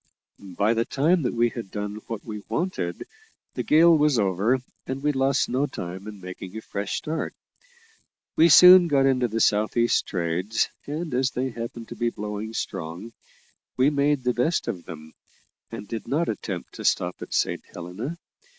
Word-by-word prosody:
By 105 +3 +3
the 115 0 +1
time 155 +8 +2
that 125 -3 -2
we 120 0 +3
had 115 -3 -7
done 105 +1 -5
what 115 -3 -6
we 105 -2 -6
wanted, 95 - -2 0.5
the - - -2
gale 165 +2 +6
was 150 -3 +3
over, 100 +4 +2 0.3
and 135 +1 -4
we 150 - +3
lost 135 0 +1
no 130 +4 0
time 95 -4 -7
in 105 -2 -8
making 90 +2 -8
a - - -5
fresh 100 -2 -4
start. 160 +1 -4 1.0
We 165 +1 +6
soon 180 +2 +9
got 140 -3 +3
into 130 -2 +2
the 115 0 -3
south 105 +1 +2
east 120 0 +2
trades, 90 +4 -1 0.2
and, 155 +1 -4
as 130 +1 +2
they 130 +1 -3
happened 115 0 -7
to - - -7
be 120 0 0
blowing 105 0 -6
strong, 85 +8 -5 0.6
we 130 +3 +4
made 145 -1 +1
the 125 0 +1
best 140 +9 0
of 95 -7 -4
them, 80 -2 -10 0.6
and 105 - -8
did 110 -1 -6
not 155 +7 0
attempt 95 -5 -5
to - - -8
stop 90 0 0
at - - -8
Saint - - 0
Helena. 95 - -6
115 Hz, 180 wpm, -25 LUFS, 100-140 Hz, 1.0 s, soon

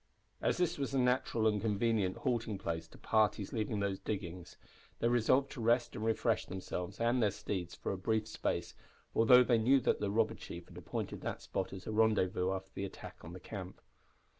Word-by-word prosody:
As - - +1
this 175 -3 0
was 135 0 -2
a - - +3
natural 125 -3 +2
and 105 -2 +3
convenient 105 -3 +1
halting 115 -6 -1
place 80 -3 -3
to - - -16
parties 105 -2 +1
leaving 110 -1 -1
those 100 -1 -1
diggings, 90 -4 -5 0.4
they 115 - +1
resolved 120 +3 +3
to 125 - -6
rest 120 +1 +2
and 110 - -4
refresh 115 -1 +1
themselves 90 -1 -5
and 120 +2 +2
their 105 - +4
steeds 95 -3 -4
for - - -3
a 100 - -2
brief 110 +2 0
space, - - -2 0.4
although 125 +3 +7
they 120 -2 +3
knew 130 +5 +5
that - - +2
the 105 - -1
robber 110 +2 +2
chief 85 -5 -9
had - - -13
appointed - - -4
that - - -4
spot - - -3
as 95 -2 -8
a - - -3
rendezvous 105 -4 +2
after 95 0 -4
the - - -4
attack 100 - -8
on 85 - -8
the 90 - -8
camp. 95 0 -7
110 Hz, 200 wpm, -34 LUFS, 95-115 Hz, 0.4 s, although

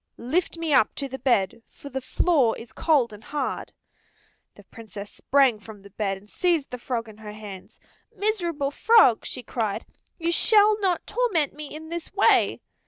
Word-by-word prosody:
Lift 330 +8 -1
me 330 -2 -1
up 220 - +4
to 280 - -3
the 265 0 -7
bed, 230 -5 +1
for 285 - -12
the 265 0 -4
floor 260 -3 +2
is 230 -1 -11
cold 270 -8 +2
and 210 +1 -12
hard." 290 +1 -4 0.8
The - - -15
Princess 210 -3 -10
sprang 265 -5 +2
from 210 -2 -12
the 200 - -14
bed 195 -1 -2
and 200 +2 -18
seized 335 - 0
the 250 - -6
frog 235 -2 -3
in 215 -1 -13
her 210 -1 -9
hands. 205 -3 -11 0.4
"Miserable 345 -9 -1
frog," 425 - +5
she 250 - -5
cried, 220 -3 -3 0.3
"you 335 0 -1
shall 425 +3 +4
not 375 -4 0
torment 395 - 0
me 300 0 -8
in 315 +1 -9
this 340 -1 -6
way." 400 - +3
270 Hz, 175 wpm, -25 LUFS, 220-335 Hz, 0.8 s, frog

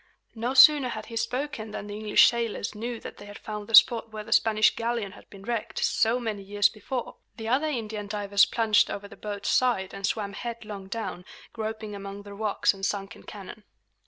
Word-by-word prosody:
No 240 +3 -3
sooner 275 -1 +8
had 220 -2 -5
he 230 - -9
spoken 250 -1 -3
than 210 - -6
the 205 - -7
English 210 0 +5
sailors 235 -3 -2
knew 230 +2 -5
that - - -9
they 205 - -11
had 205 - -10
found 210 -1 -7
the 225 - +4
spot 230 0 +6
where 215 -1 -6
the 230 +1 -1
Spanish 215 -2 +4
galleon 230 -3 -2
had 200 - -16
been 195 -1 -13
wrecked, 230 0 -3
so 230 +2 +2
many 220 -4 -4
years 205 +1 +2
before. 240 +3 -5 0.2
The 225 -1 -6
other 265 +7 +2
Indian 220 -7 -4
divers 200 -1 +3
plunged 225 -3 +3
over 200 0 -5
the 200 - -13
boat's 205 -1 -5
side 230 -7 +1
and 195 - -8
swam 200 0 -1
headlong 215 -3 -7
down, 205 -3 -5 0.3
groping 220 -1 -5
among 200 0 -7
the 205 0 -10
rocks 210 0 +1
and 195 -1 -13
sunken 195 -2 -3
cannon. 210 +1 -10
215 Hz, 200 wpm, -27 LUFS, 205-230 Hz, 0.3 s, sooner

